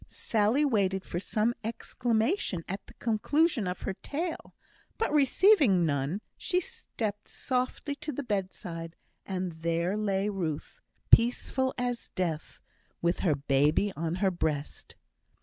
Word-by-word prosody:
Sally 225 +6 +1
waited 195 -7 +1
for 170 - -3
some 215 +4 +1
exclamation 230 - -1
at 195 +2 -5
the - - -15
conclusion 240 - +1
of 180 0 -4
her 195 - -2
tale; 320 - -5 0.4
but 445 - 0
receiving 280 - +5
none, 145 +6 -1
she 360 - 0
stepped 240 - -5
softly 255 +3 -2
to 300 +1 -4
the 285 +1 -4
bedside, 180 -6 -4 0.3
and 185 -2 -2
there 170 +3 -1
lay 200 -2 0
Ruth, 175 -7 -3 0.3
peaceful 260 +2 +4
as 245 -1 -2
death, 165 -5 -2 0.4
with 170 +1 +2
her 160 -6 +2
baby 145 +8 +2
on 165 +1 -2
her 190 +1 +2
breast. 155 -4 -3
205 Hz, 130 wpm, -29 LUFS, 170-250 Hz, 0.4 s, receiving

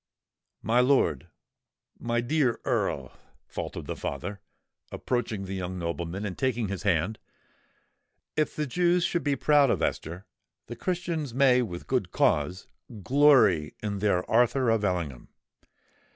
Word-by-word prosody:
"My 115 +2 +2
lord—my 120 - -2
dear 130 -1 +1
Earl," - - -1 0.3
faltered - - -6
the - - -4
father, 95 +9 -5 0.5
approaching 115 -5 -2
the 95 - -6
young 95 -1 -4
nobleman, 85 +3 -4
and 95 -3 -4
taking 120 -6 -1
his 100 -2 -4
hand, 100 +2 0 1.2
"if 155 - 0
the 150 - -1
Jews 175 +5 +2
should 175 -1 0
be 145 -1 +1
proud 145 0 +4
of - - 0
Esther, 85 +5 -3 0.4
the 120 - -8
Christians 165 -4 -3
may 130 -2 +5
with 90 -7 -5
good 125 -9 -1
cause 85 +3 +1 0.4
glory 130 - +4
in 100 -2 -2
their 95 -3 +1
Arthur 120 +1 +3
of 110 -2 +1
Ellingham! 85 -10 -2
115 Hz, 130 wpm, -27 LUFS, 90-135 Hz, 1.2 s, may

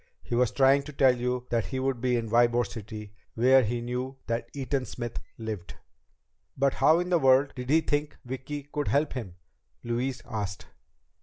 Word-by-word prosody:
He - - -6
was 120 0 +3
trying 135 +2 +4
to 150 - -8
tell 135 -2 +4
you 125 0 -2
that 115 -2 +1
he 130 - -3
would 130 -2 -1
be 125 -1 +2
in 115 -1 -1
Ybor 120 +1 +3
City, 105 -2 -8 0.2
where 130 +3 +6
he 120 +2 -1
knew 125 +2 -4
that 115 0 -2
Eaton 135 -1 -2
Smith 120 0 -5 0.2
lived." 110 -5 -6 0.8
"But 140 0 +2
how 160 +2 +4
in 180 +1 -2
the 175 - +4
world 135 0 +4
did 125 -1 -6
he 160 +3 +5
think 145 -1 -1
Vicki 130 +3 -5
could 145 +1 -4
help 145 +1 +1
him?" 110 -9 -6 0.5
Louise 120 +2 -2
asked. 100 -3 -4
125 Hz, 180 wpm, -28 LUFS, 120-135 Hz, 0.8 s, where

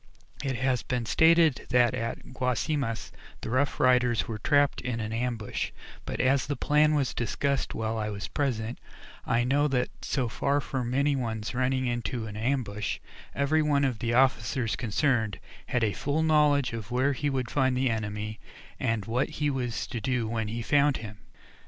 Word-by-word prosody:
It 135 -2 -1
has 130 0 +1
been 125 -2 -2
stated 160 +3 +4
that 125 0 +4
at 125 +1 -4
Guasimas, 125 0 -1 0.3
the - - -5
Rough 135 +3 +1
Riders 125 -2 +3
were 110 -2 -4
trapped 145 +5 +2
in 125 -2 -3
an 110 0 -3
ambush, 115 -2 -2 0.4
but, - - -4
as 135 +1 +2
the 145 - -1
plan 150 +2 +3
was 140 -4 0
discussed 135 +4 -1
while 110 0 -2
I 105 0 -2
was 105 0 -5
present, 120 -5 -2 0.5
I 120 +1 +2
know 140 +4 +2
that 125 -3 0
so 130 -4 -1
far 140 +5 0
from 130 -3 -3
any 140 +1 +2
ones 115 -4 -3
running 130 +1 +1
into 120 -1 -2
an 105 -1 -7
ambush, 110 -4 -1 0.4
every 145 +3 +2
one 145 -2 +2
of 125 -5 -1
the 120 0 0
officers 125 -2 +2
concerned 120 -2 0 0.3
had 125 -2 0
a 105 -3 +1
full 145 - -1
knowledge 150 -5 +3
of 115 -2 -5
where 130 +3 +2
he 145 +2 -1
would 130 -4 -2
find 130 -2 +2
the 130 -1 +2
enemy, 105 -1 -4 0.4
and 115 -3 0
what 120 +5 0
he 150 -1 +1
was 125 -3 -2
to 120 -3 -5
do 125 -1 0
when 110 -1 -2
he 115 +2 -4
found 145 +2 +3
him. 105 -2 -9
125 Hz, 175 wpm, -28 LUFS, 115-140 Hz, 0.5 s, stated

